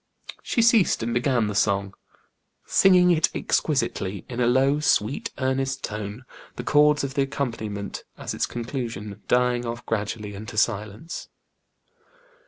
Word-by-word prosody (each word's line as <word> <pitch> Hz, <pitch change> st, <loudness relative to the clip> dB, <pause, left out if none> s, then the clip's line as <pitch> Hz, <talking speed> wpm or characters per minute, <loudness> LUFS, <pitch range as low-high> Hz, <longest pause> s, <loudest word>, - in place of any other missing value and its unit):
She 230 Hz, -, +1 dB
ceased 225 Hz, -, +4 dB
and 115 Hz, +1 st, -1 dB
began 120 Hz, -1 st, +2 dB
the 105 Hz, -, -2 dB
song, 100 Hz, -1 st, +1 dB, 0.7 s
singing 180 Hz, -2 st, +5 dB
it 160 Hz, -1 st, +3 dB
exquisitely, 100 Hz, -, -1 dB
in 125 Hz, -1 st, -6 dB
a 120 Hz, -, +3 dB
low, 135 Hz, +4 st, +3 dB
sweet, 135 Hz, -4 st, +1 dB
earnest 135 Hz, 0 st, -1 dB
tone, 105 Hz, +3 st, -5 dB, 0.3 s
the -, -, -5 dB
chords 150 Hz, 0 st, +4 dB
of 135 Hz, -1 st, -3 dB
the 140 Hz, -, +1 dB
accompaniment, 115 Hz, -7 st, -3 dB
at -, -, -5 dB
its -, -, -1 dB
conclusion, 115 Hz, -4 st, -5 dB
dying 125 Hz, 0 st, +2 dB
off 120 Hz, 0 st, -5 dB
gradually 105 Hz, -1 st, -3 dB
into 110 Hz, +3 st, -8 dB
silence. 110 Hz, -, -2 dB
120 Hz, 135 wpm, -25 LUFS, 105-140 Hz, 0.7 s, singing